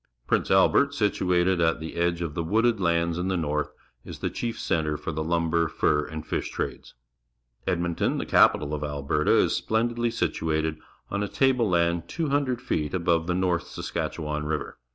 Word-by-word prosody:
Prince - - +1
Albert, - - +4
situated 90 0 +1
at 80 -1 +2
the 80 0 -6
edge 85 0 0
of 80 -3 -4
the 85 - -2
wooded 115 +6 +2
lands 85 -1 +1
in 90 - -1
the 95 -1 0
North, 75 -2 -1 0.3
is - - -8
the - - -3
chief 120 -1 -4
centre 75 -2 0
for - - -4
the 80 0 -3
lumber, 85 0 +1
fur, 75 -1 +1
and 80 0 -7
fish - - -2
trades. - - -5 0.7
Edmonton, 85 -2 0
the - - -2
capital 75 0 +4
of 75 0 -3
Alberta, 75 +1 +1
is - - +3
splen 115 +2 0
didly 120 0 0
situated 80 -5 -1 0.3
on 100 - -1
a 105 - -1
table 125 -2 +2
land 85 -1 +1
200 140 - 0
feet 80 - -2
above 85 -2 +1
the 90 - 0
North 90 -2 0
Saskatchewan 75 -2 -4
River. 75 0 -3
85 Hz, 175 wpm, -26 LUFS, 80-95 Hz, 0.7 s, Albert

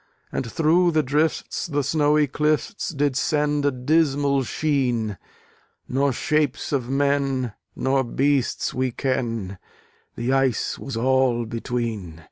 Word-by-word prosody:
And 115 - -3
through 170 +2 +3
the 155 -1 +3
drifts 150 +6 0
the 145 -3 -1
snowy 150 +1 +3
clifts 150 +8 -1
Did 145 -4 0
send 150 0 +1
a - - +3
dismal 140 +1 +2
sheen: 125 - -1 0.7
Nor 135 +2 +1
shapes 145 +1 0
of 130 -4 -1
men 135 -3 0 0.2
nor 135 0 +1
beasts 135 +1 0
we 130 0 0
ken 115 -7 -2 0.6
The 120 +3 -1
ice 135 -3 +1
was 135 -4 -5
all 130 -1 +2
between. 115 -7 -4
135 Hz, 120 wpm, -23 LUFS, 125-145 Hz, 0.7 s, through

